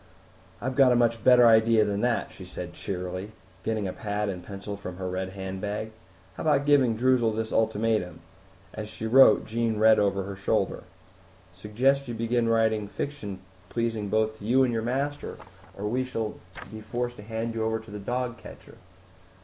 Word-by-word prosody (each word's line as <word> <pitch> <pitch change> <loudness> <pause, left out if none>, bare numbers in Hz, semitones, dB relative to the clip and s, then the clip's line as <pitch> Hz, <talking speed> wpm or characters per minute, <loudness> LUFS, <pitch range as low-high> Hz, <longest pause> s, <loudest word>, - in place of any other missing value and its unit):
"I've 130 +2 -3
got 135 -2 +6
a - - +4
much 115 -2 +2
better 125 -1 +7
idea 110 -1 +5
than 100 0 -1
that," 120 -1 0
she 95 - -11
said 90 -1 -7
cheerily, 90 +3 -5 0.3
getting 110 -3 -1
a 90 - -4
pad 105 0 -2
and 90 -2 -5
pencil 100 +1 -7
from 90 -3 -8
her 95 -1 -4
red 95 +1 -3
handbag. 100 +3 -4 0.4
"How - - -8
about 145 -3 +2
giving 135 -6 +4
Droozle 120 -2 +2
this 110 0 -3
ultimatum?" 110 -4 0 0.5
As 105 -1 -6
she 110 +1 -7
wrote, 130 +4 +6
Jean 115 -1 -1
read 110 +1 +6
over 100 -1 +1
her 100 +1 -6
shoulder, 100 +1 -1 0.7
"'Suggest 135 +6 +1
you 120 - -4
begin 115 +1 0
writing 110 -2 +2
fiction 105 -5 -5 0.3
pleasing 115 -3 -2
both 110 +1 0
to - - -12
you 125 +5 +4
and 125 -2 +1
your 115 - 0
master, 140 +5 -3 0.4
or 100 - -4
we 125 +4 0
shall 115 -4 -3 0.4
be 110 0 -8
forced 120 +2 -4
to - - -9
hand 115 +2 -4
you 115 -1 -2
over 110 0 0
to 110 -1 -12
the 105 - -6
dog 120 +3 -3
catcher!'" - - -13
110 Hz, 180 wpm, -27 LUFS, 100-120 Hz, 0.7 s, better